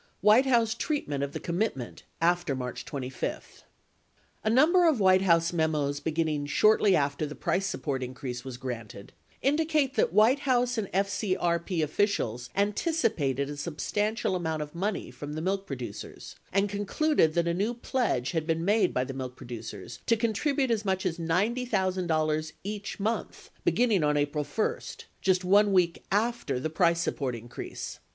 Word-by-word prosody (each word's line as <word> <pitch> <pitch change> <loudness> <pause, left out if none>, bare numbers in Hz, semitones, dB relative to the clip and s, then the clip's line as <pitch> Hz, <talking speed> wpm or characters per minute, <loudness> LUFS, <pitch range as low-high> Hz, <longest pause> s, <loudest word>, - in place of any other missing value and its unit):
WHITE 225 +6 +6
HOUSE 235 -3 +3
TREATMENT 235 - -2
OF 140 - -3
THE - - -4
COMMITMENT 170 - -3 0.2
AFTER 175 -4 +2
MARCH 125 -1 -5
2 130 -3 -5
5 - - -5 0.8
A 215 - +1
number 330 +9 +5
of 305 -8 +3
White 185 -1 +5
House 170 -2 +3
memos 150 -4 0
beginning 155 -1 -1
shortly 210 +4 +4
after 140 +1 0
the 150 - -8
price 195 +1 0
support 140 -9 -3
increase 125 -1 -5
was 130 -2 -7
granted 115 -6 -7 0.3
indicate 295 -1 +2
that - - +2
White 220 +8 +5
House 250 -3 +1
and 205 - -2
FCKP 185 -3 0
officials 140 - 0
anticipated 200 - 0
a 145 - -5
substantial 190 +8 -1
amount 160 -3 -2
of 150 - -11
money 190 -5 -2
from 145 +4 -7
the 155 - -3
milk 195 +2 -1
producers 130 -3 -7 0.2
and 195 +2 +2
concluded 205 - +1
that 170 0 +2
a 170 - +1
new 205 +7 -1
pledge 235 - -1
had 160 -2 -2
been 165 0 0
made 205 -1 +2
by 125 - +2
the 135 +1 -6
milk 130 -1 -5
producers 115 -3 -8
to 230 - +4
contribute 250 +4 0
as 220 -2 +1
much 190 -2 -1
as 175 -1 -1
$90,000 180 -5 0
each 205 +1 -5
month 220 +3 -3
begin 245 0 +3
ning 195 -7 +3
on 150 0 +2
April 145 +1 0
1 150 +10 -1 0.2
— - - -23
just 185 -1 +2
1 205 +2 +5
week 180 -3 +2
after 210 - 0
the 155 +4 -3
price 170 0 +2
support 135 -7 -2
increase 120 +1 -7
1 - - -38
175 Hz, 165 wpm, -28 LUFS, 145-215 Hz, 0.8 s, WHITE